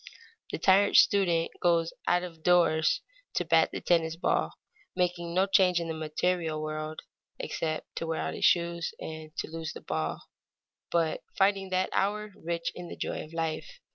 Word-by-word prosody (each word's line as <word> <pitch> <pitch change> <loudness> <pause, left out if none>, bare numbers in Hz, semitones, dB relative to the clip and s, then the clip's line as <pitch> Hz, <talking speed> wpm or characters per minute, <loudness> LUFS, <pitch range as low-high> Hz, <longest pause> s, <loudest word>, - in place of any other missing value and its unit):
The - - -3
tired 195 +2 +4
student 175 -5 +4
goes 170 -1 +2
out 180 0 +3
of 165 -3 -8
doors 160 -2 +3 0.3
to 175 - +1
bat 165 0 +4
the - - -5
tennis 165 -2 +2
ball, 165 - 0 0.4
making 175 -1 -1
no 190 +1 +4
change 185 -3 +4
in 170 - -3
the - - -1
material 160 +1 -1
world, 155 0 -4 0.4
except 155 -1 -4
to 165 - -2
wear 160 0 -1
out - - -2
his - - -5
shoes 170 -1 +2
and 155 -1 -7
to - - -4
lose 160 -1 -5
the - - -9
ball, 80 -2 -3 0.7
but 165 -2 +1 0.2
finding 195 -1 +2
that 185 0 0
hour 210 +2 0
rich 170 0 -2
in 180 -1 -8
the - - -8
joy - - -3
of 155 - -13
life. 165 - -3
170 Hz, 170 wpm, -29 LUFS, 160-180 Hz, 0.7 s, tired